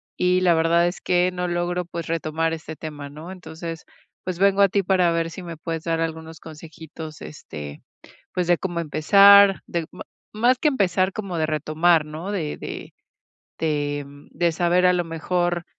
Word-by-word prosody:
y 180 Hz, 0 st, +2 dB
la 175 Hz, -2 st, +4 dB
verdad 165 Hz, +1 st, +3 dB
es 175 Hz, -, -5 dB
que 180 Hz, 0 st, +2 dB
no 180 Hz, 0 st, -2 dB
logro, 175 Hz, 0 st, -2 dB
pues, 170 Hz, -1 st, -6 dB
retomar 165 Hz, 0 st, -1 dB
este 160 Hz, 0 st, -7 dB
tema, 145 Hz, -3 st, -7 dB
¿no?, 155 Hz, +5 st, -10 dB
entonces, 165 Hz, -2 st, -8 dB, 0.4 s
pues 185 Hz, -2 st, -4 dB
vengo 200 Hz, 0 st, +4 dB
a 200 Hz, -, +6 dB
ti 200 Hz, 0 st, +1 dB
para 180 Hz, -2 st, +2 dB
ver 165 Hz, 0 st, -1 dB
si 185 Hz, -, -8 dB
me 170 Hz, -2 st, -8 dB
puedes 165 Hz, 0 st, -5 dB
dar 165 Hz, -1 st, -1 dB
algunos 160 Hz, 0 st, -5 dB
consejitos, 160 Hz, 0 st, -10 dB
este, 75 Hz, -, -9 dB, 0.5 s
pues 180 Hz, -1 st, -1 dB
de 175 Hz, -, +5 dB
cómo 175 Hz, -3 st, -3 dB
empezar, 195 Hz, +5 st, +6 dB
del 170 Hz, -2 st, -3 dB
ma -, -, -8 dB, 0.3 s
más 240 Hz, +4 st, +3 dB
que -, -, -1 dB
empezar, 190 Hz, -, +1 dB
como 195 Hz, -5 st, -5 dB
de 155 Hz, -, +1 dB
retomar, 155 Hz, +2 st, +2 dB
¿no?, 160 Hz, +6 st, -6 dB
de 160 Hz, -7 st, -3 dB
de -, -, -8 dB, 0.7 s
de, 145 Hz, -2 st, -1 dB
mm, 145 Hz, 0 st, -16 dB
de 170 Hz, +1 st, +1 dB
saber, 175 Hz, +2 st, +2 dB
a 180 Hz, -, +5 dB
lo 175 Hz, -1 st, 0 dB
mejor, 175 Hz, +1 st, -1 dB
170 Hz, 180 wpm, -23 LUFS, 160-180 Hz, 0.7 s, a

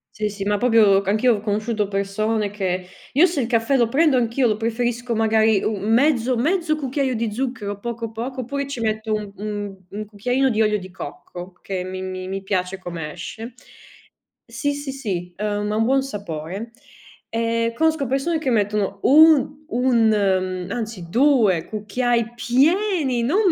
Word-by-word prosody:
Sì 210 Hz, 0 st, -1 dB
sì, 200 Hz, -1 st, -6 dB
ma 205 Hz, 0 st, 0 dB
proprio 220 Hz, -5 st, +5 dB
anch'io 215 Hz, +4 st, +2 dB
ho -, -, -8 dB
conosciuto 215 Hz, 0 st, -1 dB
persone 205 Hz, +2 st, -1 dB
che 185 Hz, -3 st, -2 dB, 0.3 s
io 300 Hz, +6 st, +6 dB
se 330 Hz, -6 st, 0 dB
il 235 Hz, -, -1 dB
caffè 235 Hz, +3 st, +2 dB
lo 235 Hz, -3 st, +2 dB
prendo 295 Hz, +2 st, +3 dB
anch'io 245 Hz, +1 st, +1 dB
lo 215 Hz, -3 st, +2 dB
preferisco 235 Hz, +1 st, -1 dB
magari 220 Hz, -2 st, +3 dB
u -, -, +1 dB
un 205 Hz, +2 st, -2 dB
mezzo 255 Hz, 0 st, +3 dB
mezzo 325 Hz, +4 st, +1 dB
cucchiaio 270 Hz, -2 st, -1 dB
di 225 Hz, -1 st, -1 dB
zucchero, 225 Hz, -5 st, -3 dB
poco, 230 Hz, 0 st, -5 dB
poco, 255 Hz, +4 st, -4 dB
oppure 280 Hz, +3 st, -3 dB
ci 275 Hz, -4 st, -5 dB
metto 220 Hz, 0 st, -2 dB
u 210 Hz, -2 st, -2 dB
un 205 Hz, -1 st, -4 dB
1 210 Hz, +1 st, -6 dB
cucchiaino 250 Hz, +6 st, 0 dB
di 220 Hz, 0 st, +1 dB
olio 210 Hz, -1 st, +3 dB
di 185 Hz, -2 st, -10 dB
cocco, 180 Hz, +1 st, -9 dB
che 190 Hz, -2 st, -3 dB
mi 185 Hz, 0 st, -5 dB
mi 185 Hz, 0 st, -5 dB
mi 195 Hz, +1 st, -4 dB
piace 190 Hz, -1 st, -1 dB
come 170 Hz, -4 st, -6 dB
esce. 225 Hz, +7 st, -8 dB, 0.9 s
Sì, 285 Hz, -1 st, -2 dB
sì, 285 Hz, -1 st, -5 dB
sì, 185 Hz, -10 st, -4 dB
uhm, 210 Hz, 0 st, -2 dB
ha -, -, -1 dB
un 225 Hz, -, +3 dB
buon 270 Hz, +2 st, +2 dB
sapore 200 Hz, -, -6 dB, 0.6 s
e 230 Hz, 0 st, 0 dB
conosco 320 Hz, -1 st, +1 dB
persone, 275 Hz, +6 st, 0 dB
che 275 Hz, -4 st, -1 dB
mettono 205 Hz, -2 st, 0 dB
un 300 Hz, 0 st, +5 dB
1 240 Hz, -3 st, +3 dB
uhm, 185 Hz, -3 st, 0 dB
anzi 220 Hz, -7 st, -5 dB
2 230 Hz, -, +3 dB
cucchiai 235 Hz, +2 st, -1 dB
pieni, 275 Hz, -, +2 dB
non 375 Hz, -, +3 dB
225 Hz, 170 wpm, -22 LUFS, 200-255 Hz, 0.9 s, io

